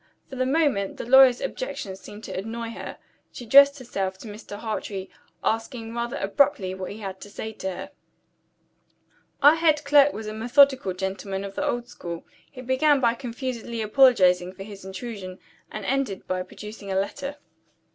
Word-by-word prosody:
For -, -, -6 dB
the 255 Hz, 0 st, 0 dB
moment, 270 Hz, -10 st, +1 dB
the -, -, -5 dB
lawyer's 260 Hz, 0 st, +7 dB
objections 220 Hz, -, -5 dB
seemed 210 Hz, +2 st, -11 dB
to -, -, -6 dB
annoy 225 Hz, +4 st, -4 dB
her. -, -, -8 dB, 0.3 s
She 245 Hz, -, -9 dB
addressed 280 Hz, +4 st, +7 dB
herself 195 Hz, -7 st, -3 dB
to 220 Hz, -, -11 dB
Mr. 205 Hz, -1 st, -9 dB
Hartrey; 205 Hz, -3 st, -5 dB, 0.3 s
asking 225 Hz, 0 st, -2 dB
rather 240 Hz, +3 st, -3 dB
abruptly 195 Hz, -2 st, +1 dB
what 190 Hz, -1 st, -6 dB
he 215 Hz, +2 st, -9 dB
had 190 Hz, -2 st, -6 dB
to 205 Hz, -, -9 dB
say 220 Hz, +2 st, -6 dB
to 190 Hz, -, -4 dB
her. 185 Hz, -, -7 dB, 1.5 s
Our 290 Hz, +2 st, +9 dB
head 310 Hz, -2 st, +3 dB
clerk 285 Hz, 0 st, +6 dB
was 220 Hz, -4 st, -7 dB
a 215 Hz, -, -5 dB
methodical 245 Hz, -2 st, +4 dB
gentleman 190 Hz, +1 st, -4 dB
of 200 Hz, -1 st, -6 dB
the 290 Hz, -, -3 dB
old 240 Hz, -5 st, -1 dB
school. 170 Hz, -1 st, -7 dB, 0.2 s
He 255 Hz, -, -10 dB
began 270 Hz, +3 st, +3 dB
by 235 Hz, -3 st, +3 dB
confusedly 235 Hz, -2 st, -5 dB
apologizing 185 Hz, -7 st, +4 dB
for 195 Hz, +1 st, -9 dB
his 200 Hz, -1 st, -10 dB
intrusion; 190 Hz, -1 st, -7 dB, 0.3 s
and -, -, -6 dB
ended 270 Hz, -8 st, -1 dB
by 185 Hz, 0 st, -1 dB
producing 200 Hz, +2 st, -9 dB
a -, -, -1 dB
letter. 275 Hz, +8 st, -4 dB
225 Hz, 170 wpm, -25 LUFS, 195-265 Hz, 1.5 s, Our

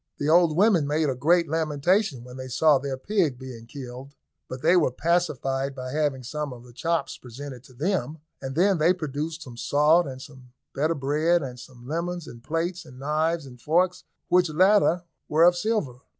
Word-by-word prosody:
The 145 Hz, -, -1 dB
old 165 Hz, -1 st, +4 dB
women 190 Hz, -7 st, +4 dB
made 150 Hz, 0 st, +1 dB
a -, -, -3 dB
great 170 Hz, +6 st, +3 dB
lamentation 160 Hz, -, 0 dB
when 125 Hz, 0 st, -11 dB
they 130 Hz, 0 st, -7 dB
saw 145 Hz, +3 st, +4 dB
their 135 Hz, -1 st, -4 dB
pig 165 Hz, -4 st, 0 dB
being 125 Hz, -3 st, -10 dB
killed, 130 Hz, +1 st, -9 dB, 0.3 s
but 130 Hz, 0 st, -8 dB
they 180 Hz, -, +5 dB
were 175 Hz, -6 st, +4 dB
pacified 135 Hz, -3 st, -1 dB
by 130 Hz, -1 st, -6 dB
having 145 Hz, -3 st, -1 dB
some 150 Hz, +3 st, -4 dB
of 120 Hz, -1 st, -10 dB
the 125 Hz, -1 st, -15 dB
chops 165 Hz, +2 st, -2 dB
presented 130 Hz, +1 st, -9 dB
to 130 Hz, -, -17 dB
them, 160 Hz, +1 st, -1 dB, 0.2 s
and 135 Hz, 0 st, -5 dB
then 185 Hz, +1 st, +3 dB
they 165 Hz, +4 st, +4 dB
produced 155 Hz, 0 st, -4 dB
some 120 Hz, -3 st, -11 dB
salt, 150 Hz, +6 st, +3 dB
and 130 Hz, -1 st, -7 dB
some 130 Hz, -3 st, -14 dB, 0.2 s
better 155 Hz, +4 st, 0 dB
bread, 155 Hz, +4 st, +1 dB
and 125 Hz, -2 st, -7 dB
some 125 Hz, -1 st, -13 dB
lemons, 170 Hz, +2 st, -3 dB
and 120 Hz, -3 st, -12 dB
plates, 170 Hz, +4 st, -2 dB
and 130 Hz, -6 st, -14 dB
knives, 155 Hz, +3 st, -1 dB
and 125 Hz, -2 st, -13 dB
forks, 180 Hz, +5 st, +1 dB, 0.2 s
which 180 Hz, -1 st, +3 dB
latter 180 Hz, +1 st, +4 dB, 0.3 s
were 155 Hz, +2 st, +4 dB
of 175 Hz, +1 st, +6 dB
silver. 175 Hz, -, -1 dB
150 Hz, 190 wpm, -25 LUFS, 130-170 Hz, 0.3 s, of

